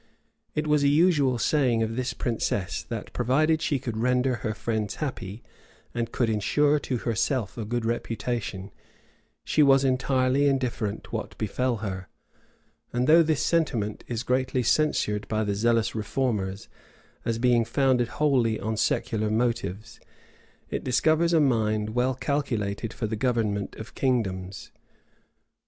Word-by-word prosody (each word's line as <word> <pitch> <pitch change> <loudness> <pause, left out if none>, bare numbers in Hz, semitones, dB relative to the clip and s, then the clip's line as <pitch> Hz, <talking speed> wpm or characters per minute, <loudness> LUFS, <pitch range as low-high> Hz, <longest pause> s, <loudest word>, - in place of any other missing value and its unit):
[*] - - -47
It 150 - 0
was 150 -1 +3
a - - +4
usual 145 -4 +3
saying 125 -4 +2
of 110 0 -3
this 125 +1 -2
princess, 105 -5 -1
that, - - -7
provided 155 +6 +2
she 145 - +1
could 120 -4 -5
render 125 +2 +1
her 110 -2 -3
friends 110 -4 -2
happy, 115 -8 -5 0.5
and 115 -1 -2
could 120 - +1
insure 145 +8 +2
to 130 -3 -2
herself 115 -1 -1
a 115 - -4
good 120 +1 -2
reputation, 115 -3 -3 0.7
she 155 - +2
was 135 -1 +5
entirely 130 +1 +2
indifferent 120 -6 -2
what 110 - -4
befell 120 +3 -1
her; 95 -2 -5 0.8
and 125 +1 0
though 160 +4 +7
this 155 -3 +1
sentiment 120 -11 0
is 120 -1 -3
greatly 130 0 0
censured 105 -7 +1
by 110 0 0
the 105 -1 -1
zealous 115 +2 +1
reformers,[] 105 -3 -2 0.6
as 115 -1 -1
being 120 -1 +3
founded 125 +1 +2
wholly 125 -6 +1
on 110 0 -3
secular 110 0 0
motives, 115 -1 -2 0.7
it - - -2
discovers 155 +6 +2
a 165 - +4
mind 110 -6 +1
well 125 +3 +1
calculated 115 -7 -2
for 120 - -4
the 110 - -2
government 110 -4 -1
of 110 - -9
kingdoms. 100 -7 -2
120 Hz, 145 wpm, -26 LUFS, 110-135 Hz, 0.8 s, though